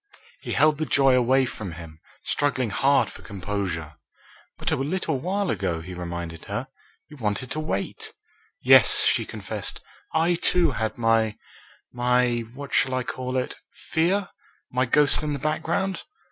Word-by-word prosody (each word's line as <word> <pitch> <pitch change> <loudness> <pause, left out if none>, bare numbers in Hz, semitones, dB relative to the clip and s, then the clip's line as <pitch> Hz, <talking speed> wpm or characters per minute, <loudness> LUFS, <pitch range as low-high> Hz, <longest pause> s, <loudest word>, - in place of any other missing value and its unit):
He - - -4
held 155 -1 +3
the 155 - -1
joy 135 -2 +4
away 130 +1 +4
from 105 -7 -6
him, 80 -1 -11 0.2
struggling 130 -6 0
hard 140 +6 +3
for - - -12
composure. 95 -6 -4 0.6
"But - - -2
a - - +3
little 150 0 -2
time 195 +1 -1
ago," 90 -5 -1
he 90 +2 -8
reminded 85 -2 -6
her, - - -4 0.4
"you 150 - -13
wanted 110 +1 -2
to 155 - -2
wait." 100 -11 -3 0.5
"Yes," - - +7
she - - +2
confessed, - - -5 0.3
"I, 165 +2 +2
too, 175 -4 +3
had 110 -3 -3
my 115 -2 +2 0.6
my 125 0 +2 0.2
what 140 0 -8
shall 130 -1 +2
I 130 - 0
call 130 +1 -4
it 130 - -3 0.2
fear? 180 +4 0 0.4
my 125 +1 +1
ghost 145 +3 +4
in 150 -1 -2
the - - -2
background?" 160 +6 -1
130 Hz, 155 wpm, -25 LUFS, 100-150 Hz, 0.6 s, Yes